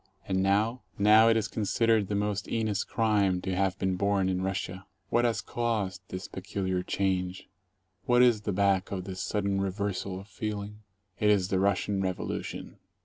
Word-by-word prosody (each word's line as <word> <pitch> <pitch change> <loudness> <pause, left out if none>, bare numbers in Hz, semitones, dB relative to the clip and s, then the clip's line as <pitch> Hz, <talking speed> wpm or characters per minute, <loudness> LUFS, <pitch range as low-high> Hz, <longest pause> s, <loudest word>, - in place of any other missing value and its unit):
And 95 0 +1
now? 105 +6 +1 0.2
Now 110 +2 +6
it 115 - +4
is 110 0 0
considered 110 0 +1
the 100 - -2
most 105 0 -1
heinous 110 -3 0
crime 105 -5 +1
to 95 0 -2
have 95 0 0
been 95 -1 -1
born 100 -1 +1
in 90 0 -1
Russia. 95 0 -3 0.2
What 120 +1 +2
has 115 -1 +1
caused 105 -6 -2
this 90 -2 -5
peculiar 95 -1 -3
change? 95 -1 -1 0.6
What 125 0 +5
is 120 -4 +4
back 100 -2 +1
of 95 -2 -3
this 95 -1 -6
sudden 100 -2 -1
reversal 95 -1 -2
of 100 - -12
feeling? 105 0 -5 0.4
It 105 - +3
is 100 -3 +3
the 95 - +1
Russian 100 0 +1
Revolution. 95 -1 -4
100 Hz, 165 wpm, -29 LUFS, 95-105 Hz, 0.6 s, Now